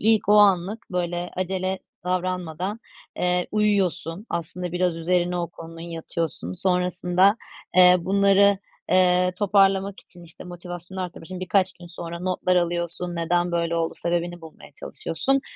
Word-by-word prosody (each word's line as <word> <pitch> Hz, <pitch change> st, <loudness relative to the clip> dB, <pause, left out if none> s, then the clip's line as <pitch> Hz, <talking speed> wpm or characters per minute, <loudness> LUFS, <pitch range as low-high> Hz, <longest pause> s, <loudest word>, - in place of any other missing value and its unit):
ilk 220 Hz, -1 st, +3 dB
o -, -, +6 dB
anlık 200 Hz, +1 st, +3 dB
böyle 175 Hz, 0 st, -2 dB
acele 185 Hz, +1 st, -1 dB, 0.3 s
davranmadan, 185 Hz, +2 st, -2 dB, 0.4 s
eee, 180 Hz, 0 st, +1 dB
uyuyorsun. 200 Hz, -2 st, 0 dB
Aslında 170 Hz, +1 st, -4 dB
biraz 180 Hz, -1 st, 0 dB
üzerine 180 Hz, +1 st, 0 dB
o 170 Hz, -, -2 dB
konunun 165 Hz, 0 st, -11 dB
yatıyorsun. 165 Hz, -, -4 dB
Sonrasında, 180 Hz, -, +2 dB, 0.4 s
eee, 180 Hz, 0 st, +8 dB
bunları, 200 Hz, +2 st, +4 dB, 0.3 s
eee, 180 Hz, 0 st, +4 dB
toparlamak 195 Hz, -1 st, +2 dB
için, 175 Hz, -, -17 dB
işte, 160 Hz, -, -13 dB
motivasyonu 175 Hz, +1 st, -8 dB
arttırmak 170 Hz, -2 st, -7 dB
için 185 Hz, 0 st, -7 dB
birkaç 185 Hz, +1 st, +2 dB
gün 175 Hz, -, -13 dB
sonra 170 Hz, 0 st, -7 dB
notlar 185 Hz, 0 st, 0 dB
alıyorsun, 175 Hz, 0 st, -1 dB
neden 175 Hz, +1 st, 0 dB
böyle 170 Hz, 0 st, 0 dB
oldu 165 Hz, 0 st, -1 dB
sebebini 175 Hz, 0 st, -2 dB
bulmaya 160 Hz, -1 st, -13 dB
çalışıyorsun 270 Hz, +10 st, -1 dB
180 Hz, 135 wpm, -24 LUFS, 170-190 Hz, 0.4 s, eee